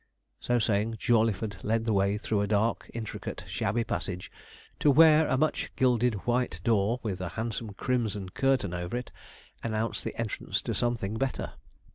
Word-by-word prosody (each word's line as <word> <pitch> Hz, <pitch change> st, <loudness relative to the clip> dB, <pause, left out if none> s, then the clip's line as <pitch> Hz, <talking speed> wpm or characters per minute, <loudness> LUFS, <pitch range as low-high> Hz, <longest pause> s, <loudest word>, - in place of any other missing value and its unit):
So 120 Hz, -, +1 dB
saying, 110 Hz, 0 st, +1 dB
Jawleyford 110 Hz, -2 st, +1 dB
led 115 Hz, +1 st, +1 dB
the 115 Hz, -, +1 dB
way 100 Hz, +1 st, +2 dB
through 105 Hz, -1 st, 0 dB
a 100 Hz, -, 0 dB
dark, 105 Hz, +2 st, +1 dB
intricate, 115 Hz, -2 st, -5 dB
shabby 115 Hz, +4 st, 0 dB
passage, 90 Hz, -5 st, -4 dB, 0.5 s
to 150 Hz, -, +4 dB
where 155 Hz, +1 st, +7 dB
a 130 Hz, -, +2 dB
much 155 Hz, +2 st, 0 dB
gilded 125 Hz, -2 st, +3 dB
white 120 Hz, -8 st, 0 dB
door, 110 Hz, +2 st, +2 dB
with 95 Hz, -5 st, -3 dB
a 90 Hz, -, -3 dB
handsome 110 Hz, -2 st, -3 dB
crimson 110 Hz, -6 st, -1 dB
curtain 135 Hz, -5 st, +1 dB
over 90 Hz, +6 st, -3 dB
it 125 Hz, -, -6 dB, 0.5 s
announced 115 Hz, 0 st, -2 dB
the -, -, -5 dB
entrance 115 Hz, -3 st, -2 dB
to -, -, -2 dB
something 110 Hz, -3 st, -1 dB
better. 135 Hz, -1 st, -2 dB
115 Hz, 160 wpm, -29 LUFS, 100-120 Hz, 0.5 s, where